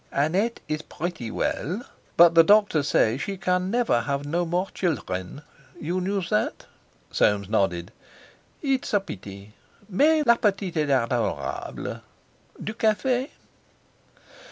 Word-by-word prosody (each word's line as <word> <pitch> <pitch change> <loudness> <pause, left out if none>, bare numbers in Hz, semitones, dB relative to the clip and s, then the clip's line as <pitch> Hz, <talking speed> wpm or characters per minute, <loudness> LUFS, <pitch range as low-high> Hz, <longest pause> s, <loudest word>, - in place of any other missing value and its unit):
"Annette 185 +11 0
is 155 0 -2
prettee 160 -8 -5
well. 180 - -2 0.3
But 170 0 +8
the 165 0 +8
doctor 205 -4 +4
say 125 -3 +2
she 195 +6 -4
can 180 0 0
never 230 - +2
have 140 +4 -2
no 170 +4 0
more 180 +3 0
children. 105 - -3 0.4
You 175 +4 -2
knew 195 +1 -1
that?" 110 -10 -1 0.5
Soames 100 -2 +2
nodded. 95 -3 0 0.7
"It's 270 -6 0
a - - +5
pity. 100 - -10 0.4
_Mais 305 +7 +4
la 235 -1 +5
petite 195 -5 0
est 150 -2 +1
adorable. 115 - -1 0.6
Du 215 - -4
café? 245 +5 +1
170 Hz, 125 wpm, -25 LUFS, -, 0.7 s, But